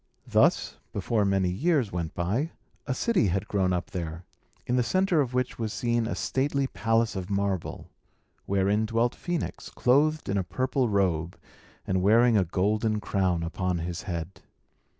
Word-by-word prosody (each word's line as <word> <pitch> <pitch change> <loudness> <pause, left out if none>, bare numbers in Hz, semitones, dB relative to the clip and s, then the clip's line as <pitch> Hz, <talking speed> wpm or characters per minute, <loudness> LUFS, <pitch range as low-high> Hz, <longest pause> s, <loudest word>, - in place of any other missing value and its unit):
Thus, - - +2
before 110 -3 0
many 95 -2 +2
years 140 - +1
went 85 -2 -4
by, 110 - -1 0.3
a 130 - 0
city 200 - +2
had 95 +3 -1
grown 95 -2 +1
up 90 0 -2
there, 85 -2 -5 0.4
in 125 - 0
the 125 - +3
centre 185 +4 +2
of 125 -2 -2
which 125 -1 -1
was 110 -2 -2
seen 120 -1 0
a - - -2
stately 140 +1 0
palace 115 -3 0
of 95 -1 -4
marble, 100 -3 -2 0.6
wherein 100 +3 +2
dwelt 115 +2 +1
Phœnix, 175 -3 -4
clothed 150 +5 +2
in 100 0 +1
a - - 0
purple 130 +7 0
robe, 90 -4 0 0.5
and 95 0 0
wearing 115 +4 +5
a 100 - +4
golden 105 +5 0
crown 95 -5 0
upon 90 +1 -1
his 85 +1 -4
head. 85 +1 -5
105 Hz, 160 wpm, -27 LUFS, 90-125 Hz, 0.6 s, wearing